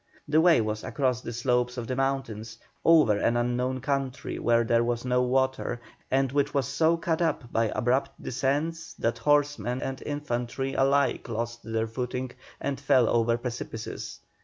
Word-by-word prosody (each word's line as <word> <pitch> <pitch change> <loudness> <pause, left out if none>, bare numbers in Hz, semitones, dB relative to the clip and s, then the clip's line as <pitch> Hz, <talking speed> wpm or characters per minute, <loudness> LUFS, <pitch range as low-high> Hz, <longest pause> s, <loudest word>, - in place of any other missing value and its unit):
The 155 +2 +4
way 165 -7 +5
was 110 0 -3
across 130 -4 0
the 115 - -6
slopes 125 +1 0
of 120 - -3
the 130 - -3
mountains, 130 -5 -2 0.3
over 155 -11 +5
an 120 +3 +2
unknown 125 +2 0
country 135 -1 -2
where 115 0 +3
there 115 0 +2
was 120 +1 -2
no 125 0 +2
water, 130 -1 0 0.3
and 135 -1 +2
which 145 +1 0
was 135 -3 +1
so 160 +4 +2
cut 165 0 -1
up 150 -7 -1
by 115 - +3
abrupt 125 +5 0
descents 150 +6 -2
that 115 - -1
horsemen 145 -5 +1
and 135 0 -4
infantry 135 -2 -3
alike 140 -1 +2
lost 120 +1 -3
their 110 0 -1
footing 125 +2 -4 0.3
and 140 -2 -3
fell 135 -4 +4
over 115 0 +2
precipices. 120 -2 -6
125 Hz, 160 wpm, -27 LUFS, 120-140 Hz, 0.3 s, way